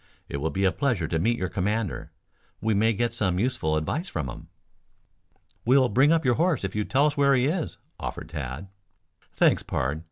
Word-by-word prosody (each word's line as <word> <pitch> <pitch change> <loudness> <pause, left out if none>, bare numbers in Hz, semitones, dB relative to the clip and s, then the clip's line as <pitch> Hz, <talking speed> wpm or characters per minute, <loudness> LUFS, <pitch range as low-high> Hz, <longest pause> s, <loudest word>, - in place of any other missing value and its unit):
It - - -4
will 75 +3 -1
be 95 +3 0
a 95 - +4
pleasure 120 - 0
to 80 +1 -1
meet 115 +7 +1
your 95 - -1
commander. 100 +3 -2 0.5
We 110 +2 +1
may 110 +3 +3
get 115 +2 -1
some 95 -6 0
useful 95 -8 0
advice 145 - -2
from 75 -6 -3
him." - - -11 1.2
"We'll 130 +1 +4
bring 135 +8 +4
up 165 -2 +2
your 125 - +4
horse 170 - +2
if 95 - -3
you 105 - +1
will - - -12
tell 140 +2 +4
us 150 -1 0
where 140 -1 +4
he 125 0 +2
is," 160 +3 -2 0.2
offered 75 - -5
Tad. 75 +2 -5 0.7
"Thanks, - - +3
pard. 70 +5 -2
110 Hz, 200 wpm, -26 LUFS, 85-135 Hz, 1.2 s, a